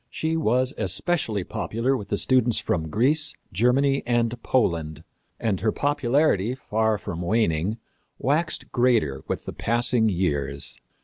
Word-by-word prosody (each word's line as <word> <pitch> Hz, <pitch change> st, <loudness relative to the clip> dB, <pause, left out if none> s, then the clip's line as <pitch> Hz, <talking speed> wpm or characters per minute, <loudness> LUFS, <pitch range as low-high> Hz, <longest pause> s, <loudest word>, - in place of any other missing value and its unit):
She 160 Hz, +1 st, -2 dB
was 130 Hz, -3 st, +1 dB
especially 105 Hz, -, 0 dB
popular 115 Hz, +8 st, -1 dB
with 105 Hz, -6 st, -5 dB
the 100 Hz, -, 0 dB
students 125 Hz, -2 st, +2 dB
from 80 Hz, -2 st, -1 dB
Greece, 145 Hz, -, +2 dB, 0.2 s
Germany 135 Hz, +7 st, +2 dB
and 120 Hz, -1 st, 0 dB
Poland, 80 Hz, -, 0 dB, 0.4 s
and 100 Hz, -5 st, 0 dB
her 110 Hz, -, +1 dB
popularity, 135 Hz, -5 st, +1 dB
far 110 Hz, -3 st, 0 dB
from 85 Hz, -3 st, -6 dB
waning, 95 Hz, 0 st, 0 dB, 0.4 s
waxed 150 Hz, +7 st, 0 dB
greater 120 Hz, -, +2 dB
with -, -, -3 dB
the -, -, -6 dB
passing 120 Hz, -1 st, +1 dB
years. 70 Hz, -7 st, -1 dB
115 Hz, 130 wpm, -24 LUFS, 95-130 Hz, 0.4 s, students